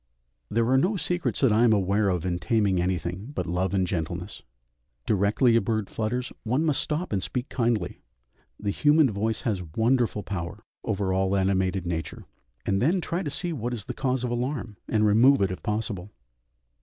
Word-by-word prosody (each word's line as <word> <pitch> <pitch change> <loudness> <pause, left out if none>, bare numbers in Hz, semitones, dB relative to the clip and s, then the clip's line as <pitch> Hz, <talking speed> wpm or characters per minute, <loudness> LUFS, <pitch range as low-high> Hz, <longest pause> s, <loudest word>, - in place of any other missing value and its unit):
There 115 +1 +1
are 130 +1 +5
no 195 +8 +1
secrets 175 +1 -1
that 135 -5 +4
I 110 +3 +4
am 115 -2 +5
aware 100 +1 +2
of 90 -3 -1
in 90 -1 -1
taming 95 0 +1
anything, 90 +3 -2
but - - -2
love 90 +3 -1
and 95 -1 +2
gentleness. 90 +2 -4 0.6
Directly 110 +4 +3
a 115 - +5
bird 110 0 -2
flutters, 120 +3 -2
one 130 +8 +1
must 150 -4 +2
stop 155 -2 -2
and 95 - +1
speak 125 +6 -3
kindly; 115 -7 -1 0.6
the 100 -1 -1
human 150 +2 +4
voice 110 +2 -1
has 105 -5 -1
wonderful 115 -2 +2
power 95 +3 -5 0.2
over 100 -4 -1
all 95 +1 +1
animated 95 -1 +1
nature, 80 -3 -4 0.4
and 95 0 +1
then 170 +8 +3
try 170 +1 -2
to 150 - -3
see 175 +4 -2
what 120 -3 -3
is 105 - -7
the - - -4
cause 130 -1 -1
of 125 - -1
alarm, 120 -2 -3
and 110 -1 +2
remove 120 +7 +5
it 95 -2 +1
if 95 - -6
possible. 105 -2 -3
110 Hz, 185 wpm, -26 LUFS, 95-125 Hz, 0.6 s, are